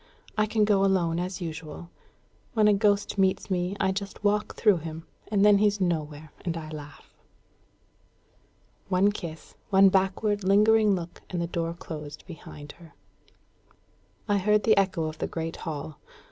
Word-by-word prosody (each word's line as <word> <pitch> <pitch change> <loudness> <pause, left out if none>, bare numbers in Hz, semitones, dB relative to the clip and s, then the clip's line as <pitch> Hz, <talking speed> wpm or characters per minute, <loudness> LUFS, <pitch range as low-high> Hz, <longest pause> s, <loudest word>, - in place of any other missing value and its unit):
I 215 0 +2
can 215 -1 +2
go 200 -2 +3
alone 175 -4 +2
as 180 0 -4
usual. 165 0 -7 0.6
When 215 -1 +4
a 210 - +6
ghost 205 0 +1
meets 190 +1 +1
me, 180 +1 -1
I 190 - +2
just 200 +1 -6
walk 210 +1 +1
through 210 -5 +4
him, 160 0 -7 0.3
and 205 -1 +3
then 205 -1 +6
he's 205 -1 +2
nowhere; 155 -4 -2
and 170 -2 -2
I 155 -1 -7
laugh." 150 -1 -10 1.8
One 195 +2 +3
kiss, 165 -6 -8 0.2
one 195 -1 +6
backward 195 +2 +1
lingering 210 +2 +4
look, 175 -1 -7
and 180 - -3
the 170 - 0
door 170 -1 -3
closed 150 -3 -8
behind 150 -3 -10
her. 160 -4 -16 1.3
I 205 -1 +2
heard 210 +2 +2
the 220 - +5
echo 190 -4 +1
of 155 0 -5
the - - -1
great 165 0 -4
hall. 155 -2 -6
185 Hz, 160 wpm, -27 LUFS, 165-205 Hz, 1.8 s, a